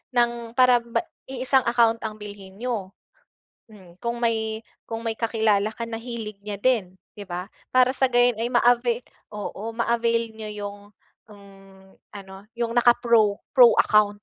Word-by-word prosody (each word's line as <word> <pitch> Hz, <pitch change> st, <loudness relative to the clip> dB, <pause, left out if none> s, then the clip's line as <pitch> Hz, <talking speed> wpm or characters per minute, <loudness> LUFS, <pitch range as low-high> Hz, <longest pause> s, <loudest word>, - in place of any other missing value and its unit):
Ng 235 Hz, -1 st, 0 dB
para 250 Hz, -1 st, +5 dB
ba 230 Hz, 0 st, -2 dB, 0.2 s
iisang 260 Hz, 0 st, +1 dB
account 230 Hz, -1 st, +3 dB
ang 220 Hz, -1 st, -4 dB
bilhin 200 Hz, -2 st, -10 dB
niyo, 215 Hz, -4 st, -4 dB, 0.8 s
hmm. 185 Hz, -4 st, -17 dB
Kung 235 Hz, 0 st, -4 dB
may, 220 Hz, -1 st, -1 dB, 0.2 s
kung 225 Hz, 0 st, -5 dB
may 225 Hz, -1 st, -3 dB
kakilala 220 Hz, -2 st, +1 dB
ka -, -, -7 dB
na 230 Hz, -1 st, -4 dB
hilig 230 Hz, -3 st, -7 dB
niya 210 Hz, -, -3 dB
din, 210 Hz, -6 st, +1 dB, 0.2 s
'di 205 Hz, -1 st, -9 dB
ba? 180 Hz, +2 st, -6 dB, 0.2 s
Para 255 Hz, 0 st, +5 dB
sa 265 Hz, 0 st, +2 dB
gayon 245 Hz, -2 st, +3 dB
ay 230 Hz, -, -1 dB
ma-avail 240 Hz, 0 st, +2 dB, 0.3 s
oo, 210 Hz, +2 st, -6 dB
ma-avail 230 Hz, 0 st, 0 dB
niyo 220 Hz, -1 st, -8 dB
yung, 205 Hz, 0 st, -6 dB, 0.5 s
mm, 195 Hz, -2 st, -18 dB, 0.2 s
ano 195 Hz, 0 st, -11 dB
yung 235 Hz, -1 st, -2 dB
naka-pro, 235 Hz, -3 st, +4 dB, 0.2 s
pro 250 Hz, -4 st, +7 dB
account. 205 Hz, -1 st, +2 dB
225 Hz, 150 wpm, -24 LUFS, 205-240 Hz, 0.8 s, pro